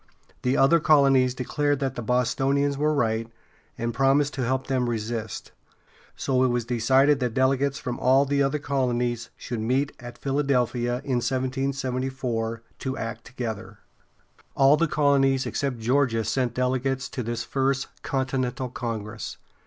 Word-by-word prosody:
The 125 +2 +1
other 160 +5 +5
colonies 135 -5 +4
declared 145 +3 0
that 135 -2 -1
the 120 - -5
Bostonians 135 +4 +1
were 150 +2 +1
right, 115 -5 0 0.5
and 115 0 -2
promised 135 +3 +2
to 130 - -2
help 130 +2 0
them 130 -2 0
resist; 115 -1 -4 0.6
so 130 -1 0
it - - +4
was 120 -2 0
decided 130 +4 +3
that 125 -3 -2
delegates 135 +1 +2
from 125 -4 -4
all 135 +2 +4
the 140 0 +1 0.2
colonies 125 -4 -1
should 120 -2 -5
meet 130 +6 0
at 120 -1 -9
Philadelphia, 125 -3 0
in 130 -3 0
1774, 130 -3 -2 0.2
to 130 -1 -3
act 115 0 -5
together. 110 -5 -6 0.8
All 135 +1 +6
the 165 +2 +1
colonies 140 -3 +2
except 135 -3 -2
Georgia 120 0 +1
sent 120 +2 -1
delegates 130 +1 0
to 125 - -4
this 120 0 -3
First 135 0 0 0.2
Continental 130 -1 -2
Congress. 115 -3 -5
130 Hz, 140 wpm, -25 LUFS, 120-135 Hz, 0.8 s, All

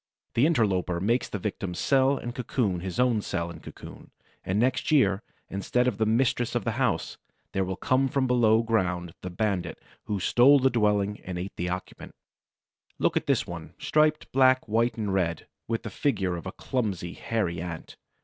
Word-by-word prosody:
The 125 +6 +4
interloper 95 - +1
makes 115 +7 +1
the - - -3
victim's 95 -2 -4
cell 135 0 +3
and 120 - -5
cocoon 115 -6 -1
his 95 +4 -5
own 125 -4 +3
cell 85 -4 -3
and - - -11
cocoon; - - -11 0.3
and 95 +3 0
next 125 +2 +1
year, 105 -10 +3 0.3
instead 125 +6 0
of 110 -5 -1
the 110 - +2
mistress 120 +1 +1
of - - 0
the - - 0
house, - - -1 0.3
there 95 - 0
will 95 0 -3
come 130 +6 +1
from 135 0 0
below 115 -3 +4
ground 90 -7 -1
the 90 - -5
bandit 95 0 -2 0.3
who 105 -2 -2
stole 125 +9 +6
the 135 -1 +3
dwelling 105 -2 +1
and 90 -1 -5
ate 90 +3 -5
the 90 +1 -2
occupant. 90 +1 -6 0.8
Look - - +1
at - - 0
this - - +2
one, - - -8
striped 155 0 +1
black, 130 -1 +4
white, 115 +2 +1
and 105 -3 -2
red, 85 -4 0 0.2
with 115 0 -2
the - - -6
figure 95 - 0
of 85 - -6
a - - -4
clumsy, 100 -8 -3
hairy 90 -8 -2
Ant. 85 -2 -7
105 Hz, 185 wpm, -27 LUFS, 90-125 Hz, 0.8 s, stole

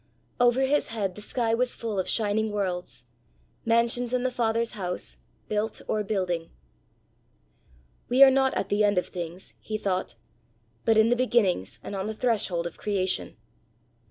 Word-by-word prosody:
'" - - -39
Over 245 +1 +4
his 285 +2 +2
head 205 -5 -2
the 210 - -10
sky 225 +1 -1
was 250 +2 +1
full 220 -4 -3
of 185 - -1
shining 215 0 +1
worlds 180 -11 -3 0.6
mansions 235 +2 +3
in 250 - 0
the 255 - 0
Father's 230 -1 0
house, 180 -3 -5 0.3
built 215 +1 -1
or 215 - 0
building. 185 -5 -2 1.6
"We 255 +3 +7
are 270 - +9
not 265 0 +2
at 195 - -2
the 205 +1 +2
end 205 -2 +3
of 180 - +2
things," 175 0 -7
he 215 - -4
thought, 185 - -2 0.7
"but 225 -1 +4
in 220 +1 +5
the 245 - +4
beginnings 195 - +1
and 200 - -6
on 195 +1 -3
the 220 - -4
threshold 210 -8 0
of 170 - -6
creation! 190 -8 -1
215 Hz, 165 wpm, -27 LUFS, 185-235 Hz, 1.6 s, are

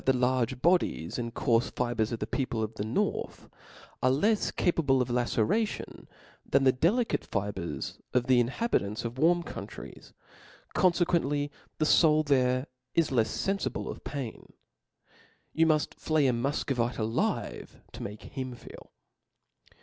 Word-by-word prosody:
the 135 - +4
large 125 0 +1
bodies 170 - +2
and 115 -1 -4
coarfe 115 -3 +1
fibres 120 -3 0
of 115 - -2
the 105 - -3
people 115 -1 -2
of 110 +1 -4
the 105 - -4
north, 110 - -2 0.5
are 130 - +4
Icfs 205 +11 +2
capable 145 -6 +2
of 125 -1 0
la 120 0 +2
ceration 205 - -1 0.4
than 135 - +2
the 130 - +6
delicate 195 - +1
fibres 100 -3 -4
of 125 -1 +2
the 130 -1 +4
inhabitants 120 - 0
of 120 +3 -5
warm 175 +3 +4
countries - - -9 0.6
j - - +1
confcquently 170 -6 +2 0.3
the 155 - +1
foul 155 0 +5
is - - -6
there 130 -1 +3 0.3
lefs 130 -9 +1
fenfible 195 0 -1
of - - -10
pain. 135 -6 -6 1.0
You 165 0 +3
muft 155 -1 +2
flay 155 -2 +1
a 125 - +3
Mufcovit^ 120 -1 -1
alive 110 0 -2
to - - -9
make 105 +1 -7
him 130 -3 -6
feel. - - -13
130 Hz, 145 wpm, -29 LUFS, 115-155 Hz, 1.0 s, the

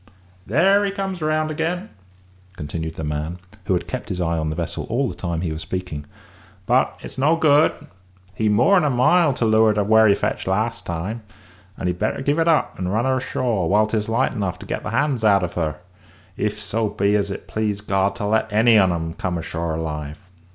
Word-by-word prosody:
There 190 - +4
he 200 - +1
comes 195 -3 -4
round 155 0 0
again," 170 +6 -3 0.7
continued 80 +1 -5
the 80 - -5
man, 75 +3 -3 0.3
who 95 - +1
had 90 - -3
kept 130 -3 -5
his 90 -3 -3
eye 85 -1 0
on 80 -1 -1
the 80 - -3
vessel 85 0 -4
all 130 +4 +1
the - - -4
time 85 -2 -3
he 85 -3 -2
was 80 - -6
speaking; 90 -6 -5 0.6
"but - - +2
it's - - -8
no 150 +5 +4
good; 155 -1 +4 0.6
he's 110 +3 0
more 125 - +4
'n 180 - +3
a 150 - +2
mile 145 +6 +4
to 120 - 0
leeward 110 -1 +4
of 105 - +2
where 110 0 +6
he 100 - +5
fetched - - -2
last - - -1
time, 90 +7 -4 0.6
and - - -5
he'd 90 0 -1
better 110 +5 -1
give 145 +3 +1
it 165 - +2
up 160 -2 +2
and 90 0 -2
run 110 +4 +1
her 130 0 +2
ashore 115 -9 -1
whilst 110 +2 +3
'tis 110 -1 -1
light 115 - +1
enough 100 -7 -2
to - - -11
get - - -3
the - - -5
hands 130 0 0
out 100 -3 +4
of 90 - -3
her, 80 -4 -1 0.6
if - - -2
so 110 0 -1
be 100 +1 +1
as 100 -1 0
it 95 -1 -7
please 105 0 -2
God 100 -1 0
to 105 - -4
let 110 +1 +1
any 110 +1 +5
on 95 -2 +4
'em 80 -1 -3
come 90 -1 -3
ashore 85 0 -3
alive." 75 -2 -4
105 Hz, 220 wpm, -22 LUFS, 90-130 Hz, 0.7 s, where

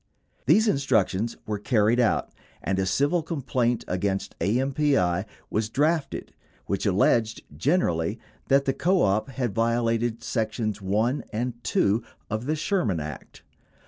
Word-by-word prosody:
These 220 +1 +5
instructions 120 - +1
were 105 -1 -3
carried 110 +1 +2
out 120 -3 +1 0.3
and 95 +2 0
a 95 - 0
civil 145 - +2
complaint 130 -7 -1
against 95 +1 -2
AMPI 120 - +1 0.3
was 110 0 0
drafted 150 +4 0 0.3
which 100 +2 -1
alleged 110 +4 +2
generally 85 - +1 0.3
that 140 +1 +4
the 135 - +1
co 180 +6 +2
op 105 +6 +1
had 125 -5 -2
vio 115 +2 +1
lated 115 0 0
sections 110 -2 -2
1 110 +8 0
and 120 +1 -3
2 105 +4 +2 0.3
of 110 +4 -2
the 155 - +1
Sherman 155 - 0
Act. 75 -2 -8
115 Hz, 135 wpm, -26 LUFS, 100-135 Hz, 0.3 s, These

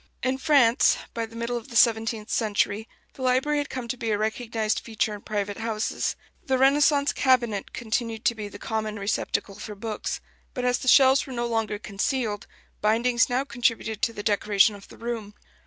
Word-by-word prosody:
In 260 +1 0
France, 275 -6 +4 0.2
by 230 -1 -3
the 225 - -15
middle 235 +1 -2
of 230 - -8
the 235 - -10
seventeenth 225 -2 +2
century, 215 0 0 0.2
the - - -12
library 260 +4 +2
had 290 - -3
come 255 -2 -5
to 235 - -2
be 230 -1 -3
a 210 - +1
recognized 220 0 -1
feature 220 -1 -2
in 205 - -8
private 205 -1 -3
houses. 220 -1 -2 0.3
The 265 -1 +1
Renaissance 280 +2 +4
cabinet 240 -7 +1
continued 230 -1 -3
to - - +4
be 215 -2 -6
the 205 - -10
common 215 0 -3
receptacle 200 0 -2
for 210 - -7
books; 215 +1 -4 0.4
but 250 -2 -2
as 245 0 +2
the - - -7
shelves 265 +1 +6
were 265 - -7
no 240 -1 -2
longer 225 -3 -1
concealed, 210 +2 -2 0.3
bindings 230 +3 +3
now 250 +2 +1
contributed 230 -4 -1
to - - +2
the 205 -2 -7
decoration 205 0 +3
of 200 -1 -12
the - - -14
room. 230 -3 -5
230 Hz, 190 wpm, -25 LUFS, 215-250 Hz, 0.4 s, shelves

